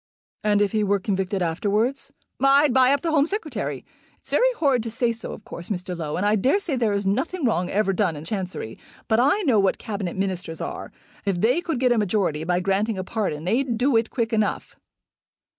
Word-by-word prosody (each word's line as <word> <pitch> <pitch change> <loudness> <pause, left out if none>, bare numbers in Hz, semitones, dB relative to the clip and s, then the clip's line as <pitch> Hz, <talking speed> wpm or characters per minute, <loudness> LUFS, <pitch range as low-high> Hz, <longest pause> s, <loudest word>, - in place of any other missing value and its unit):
"And 205 -1 +3
if 200 - 0
he 215 -1 +1
were 200 0 +2
convicted 190 -1 -1
afterwards?" 210 +10 -1 0.3
"I'd 275 0 +5
buy 260 0 +5
up 280 -1 +2
the 330 - -1
Home 295 -1 +3
Secretary. 415 +5 -4 0.3
It's - - -11
very - - +4
horrid 275 -6 +2
to 230 - -5
say 235 +1 0
so, 230 - -8
of 210 - -10
course, 170 - -9
Mr. 180 -2 -3
Low; 155 -3 -4
and 200 - 0
I 210 +1 +3
dare 260 - +2
say 345 -8 -2
there 230 -4 +1
is 200 0 -1
nothing 310 - -1
wrong 185 -6 +1
ever 200 -1 +1
done 185 -5 +1
in 150 +2 -8
Chancery. 185 - -5 0.3
But 220 0 +3
I 285 - +3
know 250 - +3
what 195 -1 +2
Cabinet 200 -5 -4
Ministers 185 -4 -3
are. 360 +1 -5 0.3
If 195 -3 -1
they 245 - +2
could 325 -7 -2
get 250 -1 +3
a 240 - +3
majority 185 -7 0
by 175 +2 0
granting 195 +3 0
a 185 - -2
pardon 185 -7 -3
they'd 235 +6 0
do 255 +2 +2
it 225 0 +2
quick 230 -2 -2
enough." 215 -1 -1
215 Hz, 215 wpm, -24 LUFS, 190-255 Hz, 0.3 s, I'd